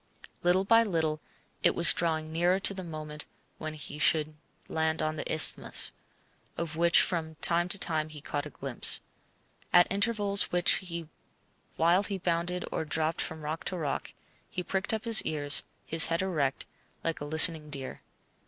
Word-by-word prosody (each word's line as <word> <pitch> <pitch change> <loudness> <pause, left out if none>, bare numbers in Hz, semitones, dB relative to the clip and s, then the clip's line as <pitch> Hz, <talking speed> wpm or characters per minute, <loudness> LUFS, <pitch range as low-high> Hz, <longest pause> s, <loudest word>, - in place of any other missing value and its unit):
Little 180 +2 +2
by 230 +3 +4
little 160 -7 -2 0.4
it - - +2
was 170 - +7
drawing 160 -2 -2
nearer 175 +3 +1
the 195 -1 -1
moment 155 -2 -6 0.3
when 155 -1 -6
he 150 0 -7
should 155 0 +2 0.3
land 160 0 -2
on 155 0 -2
the 155 - -5
Isthmus, 155 - +5 0.7
of 165 -2 -5
which 170 +1 +4
from 160 -3 -4
time 170 +3 +2
to 200 - +3
time 155 -4 -1
he 155 -1 -11
caught 145 0 -5
a - - -11
glimpse. 135 -3 0 0.7
At 175 0 +6
intervals, 200 -1 +1 1.3
while 170 +4 +2
he 200 -1 -5
bounded 175 0 -3
or - - -3
dropped 160 +1 -2
from 160 0 -6
rock 155 +2 -6
to 185 - -4
rock, 150 -4 -5 0.4
he 180 - -5
pricked 190 +2 -3
up 220 0 -4
his 230 -1 +7
ears, 145 -2 +2 0.2
his 160 0 +5
head 165 +2 -2
erect, 150 -8 -2 0.4
like 165 -2 -3
a - - -5
listening 155 0 +5
deer. 135 -3 -8
160 Hz, 160 wpm, -28 LUFS, 155-180 Hz, 1.3 s, was